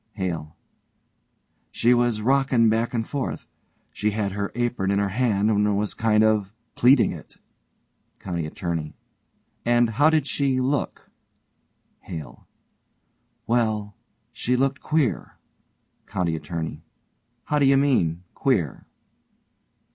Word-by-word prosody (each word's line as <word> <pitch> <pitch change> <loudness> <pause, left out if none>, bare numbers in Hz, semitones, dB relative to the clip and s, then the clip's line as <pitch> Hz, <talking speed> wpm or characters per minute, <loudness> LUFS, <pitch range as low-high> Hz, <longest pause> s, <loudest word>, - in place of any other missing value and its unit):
HALE: 85 -6 -4 1.1
She 120 +2 +3
was 120 -3 +1
rockin' 130 -2 +3
back 115 +2 0
and 115 -1 -1
forth. 140 -3 -4 0.5
She 105 - 0
had 105 -1 -2
her 100 +1 -3
apron 120 -5 -1
in 100 - +2
her 100 0 +1
hand 110 -1 +1
and 105 -1 +2
was 105 0 -1
kind 110 -1 +2
of 105 -2 +1 0.2
pleating 125 +1 +4
it. - - -11 0.8
COUNTY 85 -4 -4
ATTORNEY: 80 -2 -4 0.7
And 120 0 +3
how 145 +8 +4
did 155 -3 +2
she 135 -1 0
look? 135 +2 -2 0.9
HALE: 75 -8 -9 1.0
Well, 110 -4 0 0.4
she 125 - 0
looked 135 +2 0
queer. 155 -6 -1 0.7
COUNTY 85 -3 -1
ATTORNEY: 80 0 -5 0.6
How 150 - 0
do 140 - +4
you 135 0 +5
mean 90 - +1
queer? - - -1
110 Hz, 115 wpm, -24 LUFS, 95-125 Hz, 1.1 s, you